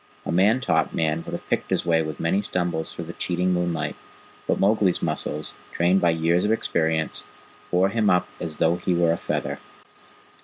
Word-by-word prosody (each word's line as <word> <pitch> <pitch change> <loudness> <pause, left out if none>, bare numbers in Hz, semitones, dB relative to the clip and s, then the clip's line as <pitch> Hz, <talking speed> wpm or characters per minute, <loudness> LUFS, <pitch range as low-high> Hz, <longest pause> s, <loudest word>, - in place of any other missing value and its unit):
A - - -2
man 105 +8 +3
taught - - +1
man 80 0 0
would - - -7
have - - -6
picked - - -1
his - - 0
way 80 -1 +3
with 80 -2 -5
many 90 +5 +1
stumbles 90 -4 -2
through 85 - -6
the 85 - -7
cheating 90 +1 0
moonlight, 90 -2 -1 0.5
but - - +1
Mowgli's 100 -2 +2
muscles, 75 -1 -1 0.2
trained 90 +3 +2
by 85 - +4
years 85 +2 +2
of 105 - +1
experience, 80 -7 0 0.5
bore 90 +2 +3
him 110 0 +1
up 90 -1 +3
as 80 -3 -5
though 85 +2 +2
he 90 0 0
were 85 -1 +3
a 85 - 0
feather. - - -3
85 Hz, 190 wpm, -24 LUFS, 80-90 Hz, 0.5 s, by